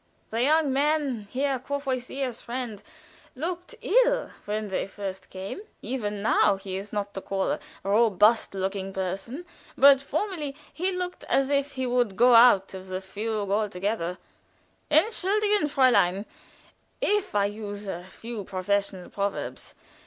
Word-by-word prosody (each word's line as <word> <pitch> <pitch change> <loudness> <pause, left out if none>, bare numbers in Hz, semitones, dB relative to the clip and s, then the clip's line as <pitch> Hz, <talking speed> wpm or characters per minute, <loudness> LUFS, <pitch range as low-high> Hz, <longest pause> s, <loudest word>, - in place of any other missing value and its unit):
The 225 +1 0
young 300 +1 +3
man, 280 -6 +1
Herr 270 0 0
Courvoisier's 260 -2 -3
friend, 235 -4 -5 0.5
looked 355 - -4
ill - - +3
when 210 0 -2
they 190 - -1
first 195 -2 -7
came; 190 - -6 0.2
even 210 -4 -3
now 210 -2 +4
he 195 -1 -6
is 195 +2 -6
not 205 -1 -3
to 195 - -5
call 195 0 -1
a - - -1 0.2
robust 210 +1 +3
looking 195 0 -3
person 195 - -4 0.3
but 275 0 +7
formerly 305 -1 -3 0.2
he 370 +3 0
looked 360 -1 -4
as 270 +1 +1
if 280 0 +1
he 260 -1 -2
would 245 -5 +1
go 245 +3 +6
out 230 -5 +7
of 190 0 -8
the 185 0 -3
fugue 205 +1 -3
altogether. 200 -3 -1 0.7
Entschuldigen, 410 +4 +3
Fräulein, 240 -9 +3 0.7
if 415 - 0
I 200 -1 +4
use 205 0 -5
a 175 -2 -4
few 220 +4 -7
professional 190 0 -2
proverbs. 200 0 -4
225 Hz, 140 wpm, -27 LUFS, 195-280 Hz, 0.7 s, but